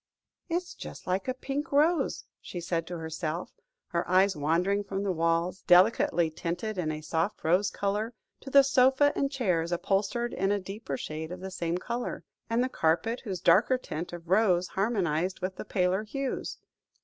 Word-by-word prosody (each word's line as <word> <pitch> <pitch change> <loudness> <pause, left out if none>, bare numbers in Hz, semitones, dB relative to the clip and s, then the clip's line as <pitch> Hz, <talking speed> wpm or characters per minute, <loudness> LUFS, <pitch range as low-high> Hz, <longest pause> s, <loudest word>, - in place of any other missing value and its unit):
"It 335 - 0
is 360 0 -3
just - - -9
like 185 +4 -1
a 255 - +1
pink 285 +4 -4
rose," 310 +4 +2 0.2
she 175 - -6
said 165 -1 -2
to 175 - -5
herself, 160 +1 -4 0.4
her 170 0 -2
eyes 190 +1 +4
wandering 175 +7 +1
from 195 0 -3
the 200 - 0
walls, 170 +2 0
delicately 175 -3 +5
tinted 175 +6 -3
a 155 -3 -2
soft 165 +5 -2
rose 180 +5 +3
colour, 210 +4 -2 0.2
to 270 - -9
the 275 0 +7
sofa 265 +2 +4
and 275 0 0
chairs 180 - 0
upholstered 200 +7 0
in 195 +2 0
a 205 - +1
deeper 195 - -5
shade 155 +3 -5
of 180 - -6
the 190 +1 -6
same 170 -2 -2
colour, 235 +6 -4 0.3
and 230 +2 +2
the - - +1
carpet, 225 +3 0
whose 190 -5 -4
darker 240 +8 +5
tint 170 -8 -6
of 175 -1 -9
rose 185 -2 +3
harmonised 190 -4 0
with 185 0 -4
the - - -6
paler 185 +1 +1
hues. 270 +4 -4
190 Hz, 175 wpm, -29 LUFS, 170-230 Hz, 0.4 s, the